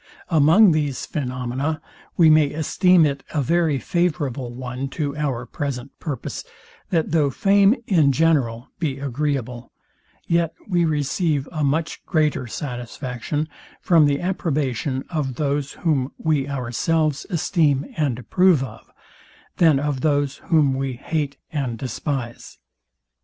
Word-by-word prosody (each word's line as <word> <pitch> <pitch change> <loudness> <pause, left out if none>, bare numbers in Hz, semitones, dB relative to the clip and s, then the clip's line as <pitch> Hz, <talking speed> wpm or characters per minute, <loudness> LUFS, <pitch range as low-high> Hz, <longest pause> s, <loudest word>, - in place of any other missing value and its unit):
Among 170 +5 +6
these 145 -4 -1
phaenomena 130 +2 -3 0.4
we 165 - +6
may 155 -2 +5
esteem 170 +2 +4
it 140 -2 -2
a 145 - +2
very 165 0 +2
favourable 145 -4 -1
one 125 +2 -5
to 145 -3 -1
our 135 -5 -2
present 135 -1 -4
purposes 145 -7 -5 0.5
that 165 -4 0
though 155 -3 +3
fame 200 - +4
in 160 -9 +4
general 135 -6 +1
be 145 -5 -1
agreeable, 135 -3 -3 0.5
yet 170 -1 +1
we 175 -4 +2
receive 150 -1 0
a 155 -3 -2
much 155 +3 -1
greater 150 -6 +1
satisfaction 125 +3 -4 0.3
from 165 -7 +4
the 140 0 +1
approbation 145 - -1
of 145 -6 -2
those, 140 0 -1
whom 140 -5 0
we 145 -3 0
ourselves 140 +4 -1
esteem 155 -5 +1
and 145 -7 0
approve 175 +3 +3
of, 130 - -10 0.7
than 160 -5 +5
of 145 -2 -2
those, 145 -2 +1
whom 150 -5 +4
we 135 0 -2
hate 140 +2 -3
and 130 -6 -2
despise. 125 0 -5
145 Hz, 125 wpm, -22 LUFS, 130-160 Hz, 0.7 s, Among